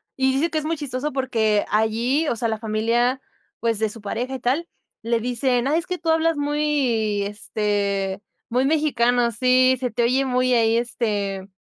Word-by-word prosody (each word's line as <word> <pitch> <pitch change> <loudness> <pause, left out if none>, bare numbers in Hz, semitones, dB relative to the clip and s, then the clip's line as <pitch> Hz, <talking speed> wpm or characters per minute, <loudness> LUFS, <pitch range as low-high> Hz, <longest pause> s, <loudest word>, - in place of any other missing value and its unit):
Y 265 0 +2
dice 300 +6 0
que 310 - 0
es 305 - -7
muy 325 +1 -1
chistoso, 285 0 -3
porque 225 -6 +1
allí 230 +8 +1
o 240 - 0
sea, 230 +1 -1
la 220 -1 -2
familia, 230 +4 0 0.4
pues, 230 -2 0
de 220 -1 +1
su 225 +2 -6
pareja 245 +6 -3
y - - -5
tal 270 +8 0 0.3
le 230 +1 0
dicen: 245 +1 0
"Ay, 305 +4 +2
es 340 - -8
que 365 -1 -2
tú 330 0 -3
hablas 320 -1 +2
muy, 280 -8 0
este, 200 -1 -2 0.3
muy 250 +3 +1
mexicano. 245 -6 +2
Sí, 255 +2 +3
se 250 -1 -1
te 235 +2 0
oye 260 +3 +2
muy 255 0 +1
ahí, 230 -1 +3
este, 205 -5 -2
245 Hz, 185 wpm, -22 LUFS, 220-270 Hz, 0.4 s, Sí